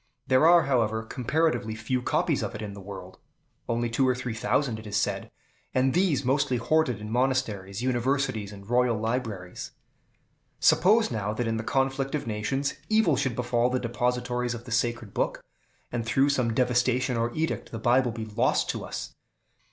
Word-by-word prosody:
There 130 Hz, +5 st, +4 dB
are, 170 Hz, -1 st, +7 dB
however, 115 Hz, -5 st, +1 dB
comparatively 125 Hz, -1 st, 0 dB
few 115 Hz, +4 st, -2 dB
copies -, -, +1 dB
of -, -, -4 dB
it 110 Hz, -, -6 dB
in 100 Hz, -1 st, -5 dB
the 100 Hz, -, -9 dB
world, 95 Hz, -1 st, -9 dB, 0.5 s
only 120 Hz, 0 st, 0 dB
two 125 Hz, +3 st, +1 dB
or 125 Hz, -, +2 dB
three 125 Hz, -2 st, -4 dB
thousand, 115 Hz, +1 st, 0 dB
it 110 Hz, -, -10 dB
is 105 Hz, 0 st, -1 dB
said, 105 Hz, -, -1 dB, 0.5 s
and 130 Hz, +1 st, +3 dB
these 175 Hz, -7 st, +2 dB
mostly 130 Hz, -1 st, +2 dB
hoarded 140 Hz, -2 st, +1 dB
in 105 Hz, 0 st, -7 dB
monasteries, 115 Hz, -5 st, -1 dB
universities, 130 Hz, -3 st, 0 dB
and 100 Hz, -1 st, -12 dB
royal 120 Hz, -1 st, +2 dB
libraries. 110 Hz, -6 st, -4 dB, 0.9 s
Suppose 215 Hz, -, +4 dB
now, 105 Hz, -2 st, -2 dB
that 120 Hz, +2 st, -2 dB
in 115 Hz, 0 st, -1 dB
the 110 Hz, -, -3 dB
conflict 135 Hz, +2 st, 0 dB
of 150 Hz, -, -3 dB
nations, 115 Hz, +6 st, -1 dB, 0.2 s
evil 215 Hz, -8 st, +4 dB
should 130 Hz, -3 st, -1 dB
befall 120 Hz, 0 st, +1 dB
the 130 Hz, 0 st, 0 dB
depositories 125 Hz, 0 st, -1 dB
of 120 Hz, -, -8 dB
the 125 Hz, -, -9 dB
sacred 120 Hz, -2 st, -1 dB
Book, -, -, -1 dB, 0.5 s
and, 120 Hz, -1 st, -2 dB
through 135 Hz, +5 st, +2 dB
some 125 Hz, -5 st, +1 dB
devastation 125 Hz, 0 st, +2 dB
or 115 Hz, +1 st, 0 dB
edict, 160 Hz, +1 st, -2 dB
the 115 Hz, -, -4 dB
Bible 120 Hz, +2 st, +3 dB
be 110 Hz, 0 st, -5 dB
lost 115 Hz, +4 st, +1 dB
to -, -, -6 dB
us. -, -, -6 dB
120 Hz, 175 wpm, -27 LUFS, 110-130 Hz, 0.9 s, are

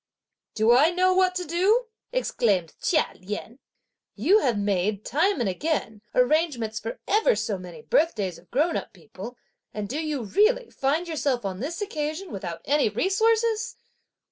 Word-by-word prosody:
"Do 220 Hz, +2 st, +4 dB
I 290 Hz, +6 st, +6 dB
know 370 Hz, +1 st, +3 dB
what 370 Hz, -1 st, +3 dB
to 360 Hz, 0 st, -2 dB
do?" 385 Hz, +9 st, +2 dB, 0.3 s
exclaimed 210 Hz, -, 0 dB
Chia 310 Hz, -4 st, +3 dB
Lien; 210 Hz, +6 st, -6 dB, 0.6 s
"you 415 Hz, +3 st, +4 dB
have 245 Hz, -, +1 dB
made, 200 Hz, 0 st, 0 dB
time 335 Hz, +6 st, +1 dB
and 235 Hz, -, 0 dB
again, 220 Hz, -, -2 dB
arrangements 250 Hz, -5 st, +2 dB
for 225 Hz, -, -6 dB
ever 445 Hz, +4 st, +3 dB
so 200 Hz, -3 st, -2 dB
many 180 Hz, +4 st, -10 dB
birthdays 210 Hz, -, +1 dB
of 175 Hz, -, -23 dB
grown 310 Hz, +6 st, +1 dB
up -, -, -4 dB
people, 190 Hz, +7 st, -10 dB, 0.4 s
and 210 Hz, -1 st, -3 dB
do 295 Hz, +9 st, -3 dB
you, 300 Hz, -5 st, -2 dB
really, 440 Hz, -, +2 dB
find 300 Hz, +6 st, 0 dB
yourself 280 Hz, -8 st, -1 dB
on 190 Hz, -1 st, -3 dB
this 335 Hz, -, -3 dB
occasion 315 Hz, -1 st, -4 dB
without 175 Hz, -4 st, -5 dB
any 285 Hz, -5 st, +3 dB
resources?" 445 Hz, -, +1 dB
285 Hz, 155 wpm, -25 LUFS, -, 0.6 s, I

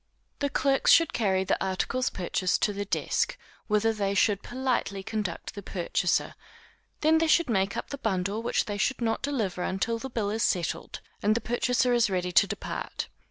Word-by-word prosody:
The 285 Hz, -, 0 dB
clerks 275 Hz, 0 st, +2 dB
should 330 Hz, -2 st, +5 dB
carry 190 Hz, -4 st, +1 dB
the -, -, 0 dB
articles 195 Hz, +7 st, 0 dB
purchased 185 Hz, 0 st, -1 dB
to 210 Hz, -, +2 dB
the 205 Hz, 0 st, -3 dB
desk, -, -, 0 dB, 0.3 s
whither 215 Hz, +1 st, +2 dB
they 200 Hz, -2 st, -1 dB
should 200 Hz, -1 st, +3 dB
politely 245 Hz, -6 st, -2 dB
conduct 210 Hz, -5 st, -4 dB
the 205 Hz, -, -7 dB
purchaser; 175 Hz, -2 st, -1 dB, 0.7 s
they 315 Hz, +1 st, +4 dB
then 325 Hz, 0 st, +3 dB
should 315 Hz, -4 st, +3 dB
make 195 Hz, -1 st, +1 dB
up -, -, -5 dB
the 280 Hz, -, -5 dB
bundle 200 Hz, -1 st, -1 dB
which 235 Hz, -, 0 dB
they 205 Hz, -1 st, -4 dB
should 265 Hz, +5 st, +1 dB
not 225 Hz, -2 st, 0 dB
deliver 225 Hz, -11 st, -2 dB
until 225 Hz, +6 st, -1 dB
the 265 Hz, -, -6 dB
bill 215 Hz, -5 st, -1 dB
is 220 Hz, +1 st, -2 dB
settled, 175 Hz, -6 st, -1 dB, 0.2 s
and 210 Hz, +1 st, +3 dB
the -, -, +1 dB
purchaser 245 Hz, +1 st, +1 dB
is 235 Hz, -3 st, +3 dB
ready 180 Hz, -1 st, -1 dB
to -, -, +5 dB
depart. -, -, -5 dB
215 Hz, 185 wpm, -28 LUFS, 190-245 Hz, 0.7 s, should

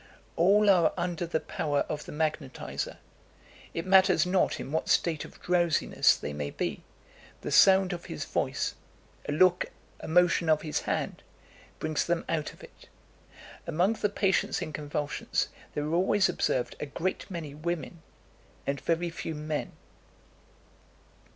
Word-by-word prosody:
All 200 Hz, +5 st, +4 dB
are 175 Hz, -5 st, +5 dB
under 175 Hz, -1 st, -2 dB
the 160 Hz, -1 st, 0 dB
power 145 Hz, -2 st, -1 dB
of 150 Hz, -1 st, -4 dB
the -, -, -8 dB
magnetiser; 150 Hz, -3 st, -3 dB, 0.8 s
it 165 Hz, -, -2 dB
matters 190 Hz, -3 st, +5 dB
not 180 Hz, 0 st, +1 dB
in -, -, -6 dB
what 160 Hz, -, -1 dB
state 160 Hz, -3 st, +2 dB
of -, -, -14 dB
drowsiness 175 Hz, -3 st, +3 dB
they 75 Hz, -, -5 dB
may 75 Hz, 0 st, -3 dB
be, -, -, -3 dB, 0.6 s
the -, -, -4 dB
sound 190 Hz, -1 st, +6 dB
of 175 Hz, -, -7 dB
his 80 Hz, -, -5 dB
voice -, -, -1 dB, 0.6 s
a -, -, +1 dB
look, 180 Hz, +4 st, +4 dB, 0.3 s
a -, -, -8 dB
motion 175 Hz, 0 st, +3 dB
of 155 Hz, -1 st, +3 dB
his 155 Hz, -2 st, -1 dB
hand -, -, -2 dB, 0.6 s
brings 155 Hz, -1 st, -1 dB
them 170 Hz, 0 st, -1 dB
out 155 Hz, -3 st, -1 dB
of -, -, -17 dB
it. -, -, -15 dB, 0.8 s
Among 180 Hz, +7 st, +2 dB
the 210 Hz, -2 st, -1 dB
patients 195 Hz, -1 st, +1 dB
in 155 Hz, -, -5 dB
convulsions 145 Hz, -1 st, -2 dB, 0.3 s
there 150 Hz, -, -1 dB
are 155 Hz, +2 st, -2 dB
always 190 Hz, +3 st, +3 dB
observed 125 Hz, -2 st, -1 dB
a 150 Hz, -, -4 dB
great 185 Hz, +8 st, -3 dB
many 165 Hz, -6 st, -6 dB
women, 165 Hz, +2 st, -4 dB, 0.6 s
and 140 Hz, 0 st, -2 dB
very 170 Hz, +1 st, 0 dB
few 165 Hz, -1 st, -5 dB
men." 150 Hz, 0 st, -3 dB
165 Hz, 150 wpm, -29 LUFS, 150-180 Hz, 0.8 s, sound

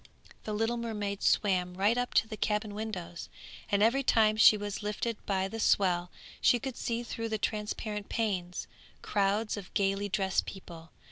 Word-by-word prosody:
The 215 Hz, -, -3 dB
little 225 Hz, +3 st, 0 dB
mermaid 210 Hz, -4 st, -3 dB
swam 180 Hz, -3 st, +2 dB
right 205 Hz, +5 st, +3 dB
up 245 Hz, 0 st, -2 dB
to -, -, +4 dB
the 220 Hz, -, -6 dB
cabin 210 Hz, 0 st, -1 dB
windows, 205 Hz, -5 st, -6 dB, 0.4 s
and 200 Hz, 0 st, +3 dB
every 240 Hz, +5 st, +4 dB
time 220 Hz, -4 st, +4 dB
she 215 Hz, 0 st, +7 dB
was 205 Hz, 0 st, -4 dB
lifted 210 Hz, +2 st, -3 dB
by 190 Hz, -1 st, +1 dB
the 225 Hz, +3 st, -6 dB
swell 180 Hz, -4 st, +2 dB, 0.3 s
she 245 Hz, -, +5 dB
could 260 Hz, +1 st, -5 dB
see 235 Hz, -1 st, -2 dB
through 230 Hz, -1 st, -4 dB
the 220 Hz, -, -1 dB
transparent 210 Hz, 0 st, -3 dB
panes 185 Hz, -6 st, -2 dB, 0.4 s
crowds 205 Hz, +2 st, 0 dB
of 195 Hz, -3 st, -8 dB
gaily 200 Hz, +1 st, +1 dB
dressed 190 Hz, -1 st, 0 dB
people. 170 Hz, -4 st, -9 dB
210 Hz, 165 wpm, -30 LUFS, 195-225 Hz, 0.4 s, she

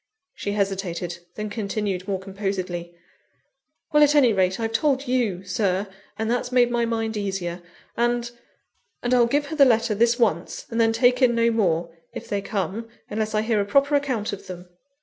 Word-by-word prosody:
She 205 Hz, -, -4 dB
hesitated, 190 Hz, -4 st, -2 dB, 0.2 s
then 210 Hz, -1 st, -5 dB
continued 200 Hz, -3 st, -3 dB
more 195 Hz, -1 st, 0 dB
composedly; 190 Hz, -3 st, -4 dB, 1.0 s
"Well, 300 Hz, -, +5 dB
at 295 Hz, 0 st, +5 dB
any 255 Hz, -6 st, +5 dB
rate 190 Hz, 0 st, +1 dB
I've 225 Hz, -1 st, -1 dB
told 275 Hz, +3 st, +1 dB
you, 230 Hz, -8 st, 0 dB
Sir, 190 Hz, +1 st, 0 dB, 0.3 s
and 220 Hz, +1 st, -1 dB
that's 245 Hz, +1 st, -1 dB
made 245 Hz, -1 st, +4 dB
my 240 Hz, -1 st, +1 dB
mind 225 Hz, -1 st, -2 dB
easier; 190 Hz, -4 st, -3 dB, 0.3 s
and 240 Hz, 0 st, 0 dB, 0.7 s
and 245 Hz, +1 st, +1 dB
I'll 240 Hz, -2 st, +5 dB
give 290 Hz, +4 st, +1 dB
her 315 Hz, -, -4 dB
the 290 Hz, -, +6 dB
letter 230 Hz, -3 st, +3 dB
this 235 Hz, +3 st, +3 dB
once, 195 Hz, -8 st, 0 dB
and 230 Hz, 0 st, +1 dB
then 225 Hz, 0 st, +4 dB
take 245 Hz, +3 st, +3 dB
in 240 Hz, -2 st, +4 dB
no 230 Hz, 0 st, +3 dB
more 170 Hz, -6 st, 0 dB, 0.2 s
if -, -, -7 dB
they 200 Hz, -1 st, -1 dB
come, 210 Hz, +2 st, -3 dB, 0.2 s
unless 215 Hz, 0 st, -2 dB
I 215 Hz, -, +2 dB
hear 220 Hz, -2 st, +1 dB
a -, -, -1 dB
proper 280 Hz, +7 st, +2 dB
account 260 Hz, -8 st, 0 dB
of 200 Hz, -, -8 dB
them." 180 Hz, 0 st, -9 dB
220 Hz, 185 wpm, -24 LUFS, 195-240 Hz, 1.0 s, the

